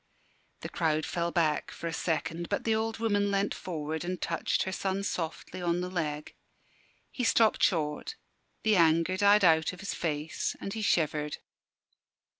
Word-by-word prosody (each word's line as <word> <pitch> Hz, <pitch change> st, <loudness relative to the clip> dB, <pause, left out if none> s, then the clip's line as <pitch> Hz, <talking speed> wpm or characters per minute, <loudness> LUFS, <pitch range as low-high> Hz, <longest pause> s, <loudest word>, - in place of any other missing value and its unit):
The -, -, -5 dB
crowd 155 Hz, -2 st, 0 dB
fell 170 Hz, 0 st, -1 dB
back 165 Hz, -4 st, +1 dB
for -, -, -8 dB
a 165 Hz, -, -2 dB
second, 165 Hz, +1 st, -2 dB
but -, -, -1 dB
the 225 Hz, -, +2 dB
old 220 Hz, 0 st, -1 dB
woman 205 Hz, -3 st, +1 dB
leant 200 Hz, 0 st, +1 dB
forward 160 Hz, -2 st, -4 dB
and 180 Hz, +1 st, -3 dB
touched 165 Hz, -, 0 dB
her 190 Hz, -, -3 dB
son 195 Hz, +1 st, -2 dB
softly 175 Hz, -1 st, -4 dB
on 175 Hz, 0 st, 0 dB
the 180 Hz, 0 st, -4 dB
leg. 150 Hz, -4 st, -3 dB, 0.8 s
He 250 Hz, -, -3 dB
stopped 225 Hz, -1 st, +4 dB
short: 160 Hz, -, +1 dB, 0.5 s
the 220 Hz, -1 st, +4 dB
anger 165 Hz, +1 st, +4 dB
died 205 Hz, +1 st, +5 dB
out 160 Hz, 0 st, +4 dB
of 180 Hz, -, -11 dB
his 200 Hz, -, -4 dB
face, 155 Hz, -1 st, -2 dB
and 195 Hz, -, -5 dB
he 220 Hz, -, -4 dB
shivered. 150 Hz, -6 st, +1 dB
175 Hz, 165 wpm, -29 LUFS, 160-200 Hz, 0.8 s, died